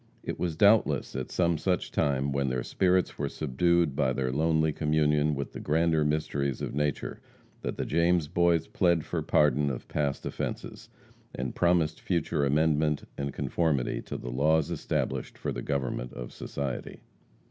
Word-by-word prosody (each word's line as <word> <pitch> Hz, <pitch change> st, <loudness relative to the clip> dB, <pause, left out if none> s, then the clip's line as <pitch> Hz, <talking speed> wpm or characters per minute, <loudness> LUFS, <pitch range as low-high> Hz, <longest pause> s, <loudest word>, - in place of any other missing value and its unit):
It -, -, -5 dB
was 85 Hz, -3 st, -1 dB
doubtless 105 Hz, -2 st, +3 dB
at 65 Hz, -1 st, -3 dB
some 85 Hz, -3 st, +1 dB
such 90 Hz, +2 st, -1 dB
time, 70 Hz, -1 st, +1 dB
when 70 Hz, -1 st, 0 dB
their 65 Hz, -1 st, -1 dB
spirits 95 Hz, -1 st, +1 dB
were 70 Hz, -1 st, -1 dB
subdued 80 Hz, +2 st, +1 dB
by 65 Hz, -2 st, +1 dB
their 65 Hz, -1 st, -1 dB
lonely 80 Hz, +2 st, +2 dB
communion 75 Hz, -1 st, +2 dB
with 70 Hz, 0 st, -5 dB
the -, -, -6 dB
grander 80 Hz, 0 st, +2 dB
mysteries 70 Hz, -3 st, -1 dB
of -, -, -4 dB
nature, 75 Hz, 0 st, -2 dB, 0.4 s
that -, -, -4 dB
the -, -, -2 dB
James 85 Hz, 0 st, +2 dB
Boys 85 Hz, 0 st, +2 dB
plead 85 Hz, -3 st, +2 dB
for -, -, -2 dB
pardon 75 Hz, -1 st, +3 dB
of 65 Hz, -, -5 dB
past 70 Hz, -2 st, -2 dB
offences, -, -, -5 dB, 0.5 s
and 65 Hz, 0 st, -3 dB
promised 85 Hz, -3 st, +2 dB
future 80 Hz, -4 st, 0 dB
amendment 75 Hz, +1 st, +2 dB
and 70 Hz, 0 st, -3 dB
conformity 75 Hz, -6 st, 0 dB
to -, -, -6 dB
the -, -, -6 dB
laws 80 Hz, +5 st, +2 dB
established 85 Hz, -, -2 dB
for -, -, -3 dB
the -, -, -4 dB
government 65 Hz, -3 st, -2 dB
of 60 Hz, -1 st, -7 dB
society. 70 Hz, -3 st, -5 dB
75 Hz, 160 wpm, -28 LUFS, 70-85 Hz, 0.5 s, doubtless